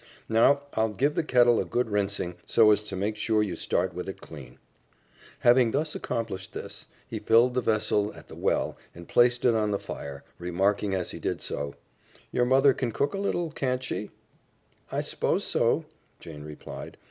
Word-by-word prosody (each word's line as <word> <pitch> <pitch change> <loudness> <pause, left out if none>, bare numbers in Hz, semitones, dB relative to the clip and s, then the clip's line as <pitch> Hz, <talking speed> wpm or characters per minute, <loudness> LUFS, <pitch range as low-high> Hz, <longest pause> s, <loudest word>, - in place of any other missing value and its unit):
Now, 115 +6 +4
I'll 110 0 +1
give 135 +8 +1
the 170 - +1
kettle 120 -5 +4
a - - +1
good 125 0 -1
rinsing, 100 -3 -1
so 110 -2 +6
as 105 - +3
to - - -5
make 100 +3 -1
sure 110 0 +1
you 95 -5 -3
start - - 0
with 90 +2 -5
it 95 - -7
clean." 65 -5 -11 0.8
Having 120 -1 +5
accomplished 115 -10 -3
this, - - -8 0.2
he - - -5
filled 120 +3 +4
the 125 - +1
vessel 105 -2 +1
at - - -13
the - - -12
well - - 0 0.2
and 85 0 -11
placed 120 0 +3
it 120 - +5
on 110 -1 +1
the 100 - +1
fire, 70 -6 -7 0.2
remarking 95 +3 0
as 90 -2 -2
he - - -7
did - - -2
so, 70 -1 -4 0.6
"Your 125 - +2
mother 135 +2 +5
can 125 -3 -2
cook 140 +6 0
a 195 - -3
little, 175 -4 -1
can't 130 -3 -1
she?" 105 -4 -4 0.8
"I - - 0
s'pose - - -1
so," - - +1 0.3
Jane 75 -3 -10
replied. 75 0 -9
110 Hz, 180 wpm, -27 LUFS, 95-125 Hz, 0.8 s, so